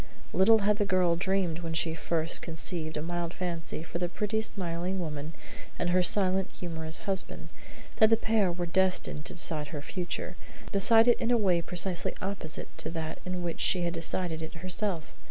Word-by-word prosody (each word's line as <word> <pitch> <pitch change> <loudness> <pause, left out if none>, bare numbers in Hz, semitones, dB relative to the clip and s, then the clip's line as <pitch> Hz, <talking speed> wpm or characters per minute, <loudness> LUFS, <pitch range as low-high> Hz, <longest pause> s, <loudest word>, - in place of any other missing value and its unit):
Little 200 +5 +6
had 210 0 +3
the - - +3
girl 180 -3 +2
dreamed 185 -2 0
when 165 -1 -4
she 160 0 +1
first 160 +1 +1
conceived 160 -1 -2
a 150 - -3
mild 175 0 -3
fancy 170 -3 -3
for 170 +1 -5
the 175 -1 -1
pretty, 215 +4 -1
smiling 180 -2 -3
woman 155 -2 -5 0.4
and 175 - 0
her 180 +1 +4
silent, 190 0 +3
humorous 160 -1 -4
husband, 195 -2 -1 0.5
that 220 - +6
the 225 - +5
pair 220 -5 +2
were 175 0 -3
destined 180 -3 +1
to - - -4
decide 160 -4 -1
her 145 0 -6
future 180 +1 -5 0.3
decide 225 +3 +5
it 240 - +5
in 230 - -1
a 245 - +4
way 185 -6 +2
precisely 175 +1 +1
opposite 190 -5 -4
to - - -1
that 160 -1 -5
in 180 -1 -3
which 170 -1 -3
she 180 -2 +3
had 170 -1 -1
decided 165 -1 +2
it 160 - -7
herself. 180 0 -2
175 Hz, 185 wpm, -29 LUFS, 165-190 Hz, 0.5 s, Little